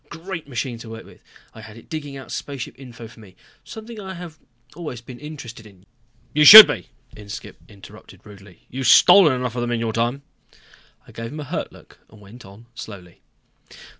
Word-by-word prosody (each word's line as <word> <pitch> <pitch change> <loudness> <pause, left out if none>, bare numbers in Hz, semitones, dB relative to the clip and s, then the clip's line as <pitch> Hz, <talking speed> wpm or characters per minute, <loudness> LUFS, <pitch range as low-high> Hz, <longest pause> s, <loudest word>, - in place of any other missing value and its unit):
Great 170 -1 -9
machine 125 -2 -5
to 115 - -12
work 115 0 -10
with. - - -19 0.3
I 110 - -13
had 110 0 -14
it 115 - -17
digging 145 -4 -7
out 135 - -12
spaceship 140 -4 -7
info 120 -3 -12
for 115 - -18
me, 95 -4 -17 0.3
something 220 0 -11
I 190 -2 -8
have 170 -3 -11 0.4
always 150 -8 -8
been 120 +1 -13
interested 135 -7 -11
in 95 -2 -21 0.2
" 120 0 -38
"You 150 - +2
should 215 +7 +13
be," - - -6 0.3
Inskipp 105 +1 -11
interrupted 100 -2 -16
rudely. 100 -3 -17
"You've 130 0 -5
stolen 160 +3 +6
enough 125 -2 -4
of 120 - -4
them 120 - -3
in 120 -1 -2
your 115 -1 -3
time." 120 +5 -2 0.8
I - - -17
gave 115 0 -8
him 155 - -9
a - - -6
hurt 140 - -6
look - - -20
and 110 - -19
went 105 +3 -16
on 100 +4 -17
slowly. 95 -6 -12
120 Hz, 195 wpm, -20 LUFS, 110-150 Hz, 0.8 s, should